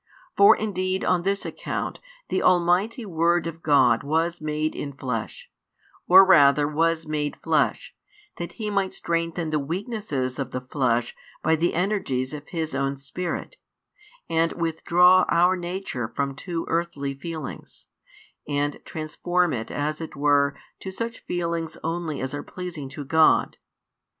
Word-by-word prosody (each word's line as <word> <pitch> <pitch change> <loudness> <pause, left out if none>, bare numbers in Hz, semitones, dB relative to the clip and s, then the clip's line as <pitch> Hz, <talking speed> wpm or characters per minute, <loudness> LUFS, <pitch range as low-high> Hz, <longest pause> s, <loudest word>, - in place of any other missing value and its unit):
For 400 +2 +7
indeed 190 -3 -2
on 180 -1 +2
this 195 +2 0
account - - -4 0.3
the - - 0
Almighty 185 +7 +2
Word 170 -1 +1
of 165 0 -6
Glod 130 -7 +4
was 165 +3 -1
made 155 0 -1
in 140 -1 -5
Flesh, 130 - -5 0.6
or 190 +2 +9
rather 145 -5 +6
was 165 +2 +1
made 150 -1 -2
Flesh, - - +1 0.4
that 175 - -5
He 215 -3 -4
might 195 -2 0
strengthen 165 -1 -2
the 155 - +1
weaknesses 160 - -3
of 135 -2 -2
the 125 - -2
flesh 125 -3 0 0.3
by 160 +1 +3
the 170 +2 0
energies 170 -9 -1
of 150 -1 -8
His 160 -3 -3
own 135 0 -1
Spirit, 175 - -5 0.7
and 165 0 +1
withdraw 175 +2 +4
our 180 +2 +4
nature 175 -9 -4
from 140 +4 -2
too 165 +3 -4
earthly 165 -5 -2
feelings, 155 +1 -8 0.6
and 145 0 -2
transform 175 +2 -1
it 115 -3 -4
as 150 +2 -2
it 160 - -7
were 140 0 +3 0.2
to 190 - -6
such 230 +4 -4
feelings 170 -2 -2
only 165 -2 -3
as 130 +1 -3
are 145 - -3
pleasing 170 -5 -7
to 145 +2 -7
God. 160 +3 +3
165 Hz, 145 wpm, -25 LUFS, 145-180 Hz, 0.7 s, or